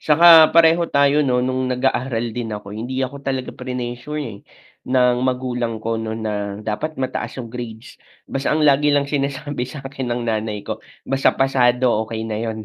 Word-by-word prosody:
tsaka 155 +3 +3 0.3
pareho 165 +1 +6
tayo 140 +1 +3
nun 125 -1 +2
nung 130 0 -1
nag-aaral 125 -2 -1
din 115 -2 -4
ako, 105 -1 -8
hindi 125 +5 -3
ako 130 +2 -6
talaga 135 -2 -3
prinesure 125 +4 -5
eh, 110 -7 -7 0.5
ng 125 -1 +3
magulang 125 -2 -2
ko 115 +1 -1
nun 110 0 -4
na 110 - -1 0.3
dapat 155 +9 -3
mataas 130 -1 -3
yung 120 -3 -6
grades, 120 -1 -8 0.3
basta 135 0 -2
ang 155 0 +2
lagi 145 0 +4
lang 145 0 +3
sinasabi 140 -1 -2
sakin 135 -1 -6
ng 120 +1 -1
nanay 110 -2 -2
ko, - - -5 0.3
basta 135 0 +2
pasado 130 -2 +2 0.2
okey 110 0 -4
na 110 -1 -3
yun. 110 -1 -3
125 Hz, 170 wpm, -20 LUFS, 115-135 Hz, 0.5 s, pareho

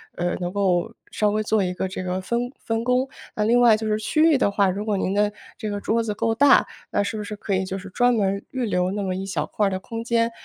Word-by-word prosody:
呃， 175 0 -1
能 175 -1 -3
够 195 +1 +1 0.2
稍 210 - +1
微 215 +1 0
做 215 -1 +1
一 180 -1 -1
个 190 - -2
这 185 0 -5
个 185 0 -2
分 235 +5 -2
分 225 0 -2
工。 250 +2 +2 0.3
那 210 - 0
另 235 +3 +4
外 230 -3 +6
就 220 0 -4
是 215 0 +1
区 305 +8 0
域 320 -4 +5
的 205 - +2
话， 200 -1 +2
如 200 +3 -2
果 210 -2 0
您 190 - -1
的 205 +1 +2 0.3
这 215 -2 -4
个 205 - -3
桌 230 +1 +1
子 215 -2 -2
够 225 +1 0
大， 280 +2 +6 0.3
那 - - +2
是 205 - -3
不 210 - -4
是 210 +1 -6
可 200 0 -4
以 190 - 0
就 190 +1 -4
是 195 - -10
专 245 +5 +3
门 200 -3 0
预 260 -2 -2
留 180 -3 0
那 205 +1 -3
么 185 -1 -2
一 190 +1 -4
小 195 - -2
块 210 - 0
儿 - - +1
的 185 - -2
空 230 +3 -6
间， 230 0 +1
210 Hz, 305 characters per minute, -23 LUFS, 190-230 Hz, 0.3 s, 外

